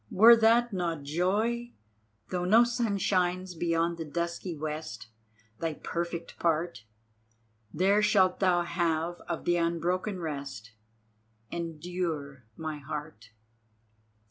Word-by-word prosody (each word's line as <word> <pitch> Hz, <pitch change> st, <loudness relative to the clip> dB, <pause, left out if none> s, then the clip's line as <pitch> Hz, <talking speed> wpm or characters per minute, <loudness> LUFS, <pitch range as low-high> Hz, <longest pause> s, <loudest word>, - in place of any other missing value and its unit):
Were 230 Hz, +4 st, +8 dB
that 230 Hz, +1 st, +4 dB
not 170 Hz, -5 st, -2 dB
joy? 210 Hz, +10 st, 0 dB, 0.6 s
Though 180 Hz, -1 st, -1 dB
no 215 Hz, +6 st, +6 dB
sun 235 Hz, -4 st, 0 dB
shines 185 Hz, -1 st, 0 dB
beyond 170 Hz, 0 st, 0 dB
the -, -, -2 dB
dusky 170 Hz, +2 st, -3 dB
west, 150 Hz, -7 st, -5 dB, 0.5 s
Thy 160 Hz, -2 st, -2 dB
perfect 170 Hz, +1 st, -5 dB
part 165 Hz, -7 st, 0 dB, 0.9 s
There 195 Hz, -, +3 dB
shalt 190 Hz, -3 st, +3 dB
thou 180 Hz, -2 st, +3 dB
have 170 Hz, 0 st, -1 dB
of 170 Hz, -, -3 dB
the 175 Hz, 0 st, +3 dB
unbroken 175 Hz, +3 st, -1 dB
rest; 140 Hz, -8 st, -5 dB, 0.8 s
Endure, 165 Hz, -5 st, -4 dB
my 155 Hz, -2 st, -4 dB
heart!" 145 Hz, -5 st, -7 dB
170 Hz, 110 wpm, -29 LUFS, 160-185 Hz, 0.9 s, Were